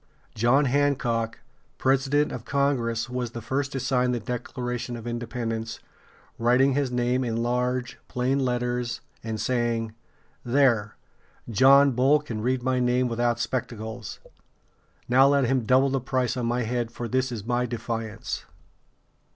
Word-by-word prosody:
John 120 +6 +3
Hancock, 125 -5 0 0.4
president 135 +2 +2
of 115 - -6
Congress, 130 -5 0
was 125 -1 -4
the 120 - -5
first 135 +4 -2
to 135 - -2
sign 125 -1 +1
the 120 - -1
Declaration 125 +1 -4
of 115 - -9
Independence, 115 -1 -4 0.6
writing 125 +4 +4
his 140 -1 0
name 125 +1 0
in 115 -1 -1
large, 125 +1 -1
plain 130 +2 0
letters, 125 -2 -1 0.2
and 110 -1 -4
saying: 115 -2 -1 0.5
"There; 120 -5 +2 0.6
John 135 +5 +6
Bull 135 +4 +4
can 120 -8 -5
read 125 +2 0
my 130 0 +1
name 125 0 +2
without 120 0 0
spectacles. 115 -2 -4 0.9
Now 130 +2 +6
let 140 0 +3
him 125 -1 +1
double 130 +3 +4
the 135 -1 0
price 130 0 0
on 125 -2 -2
my 120 +1 0
head, 120 0 -2
for 120 0 -5
this 130 +2 0
is 110 -4 -5
my 125 +1 0
defiance." 115 -2 -4
125 Hz, 145 wpm, -26 LUFS, 115-130 Hz, 0.9 s, John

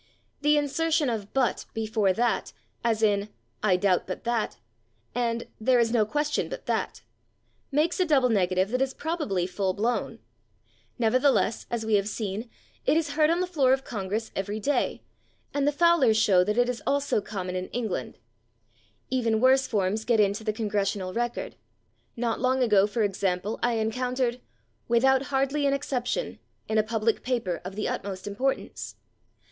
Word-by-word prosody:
The 300 0 +4
insertion 295 0 +1
of 210 -3 -4
/but/ 260 -3 0
before 220 -3 +1
that, 235 +5 0 0.3
as 225 -1 +1
in 205 -1 +2 0.3
"I 195 -4 +3
doubt 185 -1 +1
/but/ 185 - -5
that" 235 -2 -1 0.6
and 235 -1 -1
"there 250 +3 +3
is 230 -1 +2
no 220 -3 +2
question 295 +5 -1
/but/ - - -7
that," - - -2 0.7
makes 310 +6 +1
a 370 - +3
double 275 -6 +3
negative 185 -2 +2
that 255 +1 0
is 265 0 0
probably 295 - -1
full 190 0 -1
blown. 225 +1 -1 0.8
Nevertheless, 250 0 +2
as 235 -2 -2
we 220 -1 +3
have 200 +1 -1
seen, 215 +2 -4 0.3
it 310 - +3
is 320 -3 0
heard 305 +1 +3
on 340 +2 +2
the - - +1
floor 285 -8 +3
of 265 0 0
Congress 210 +1 -4
every 205 +2 -3
day, 285 +7 0 0.5
and 285 0 +1
the - - +4
Fowlers 295 -7 +4
show 195 -4 +5
that 210 +3 -1
it 245 0 +4
is 250 -1 -3
also 280 -6 +1
common 185 -3 -5
in 185 0 -3
England. 220 - -4 0.9
Even 230 -4 +1
worse 265 +2 +4
forms 205 0 0
get 230 -1 +2
into 205 +1 +2
the 215 - 0
/Congressional 205 -3 -2
Record/. 240 0 -3 0.6
Not 230 -1 -1
long 255 +1 +2
ago, 205 -4 +4
for 220 +1 -1
example, 195 0 -1
I 240 0 +2
encountered 245 +2 -1 0.5
"without 265 +3 +3
/hardly/ 275 +1 +1
an 275 - +2
exception" 275 - -2 0.3
in 220 0 +2
a - - +4
public 220 0 0
paper 230 -9 -2
of 185 +2 -7
the 210 - -2
utmost 190 -1 -4
importance. 235 +7 -3
230 Hz, 165 wpm, -27 LUFS, 205-265 Hz, 0.9 s, show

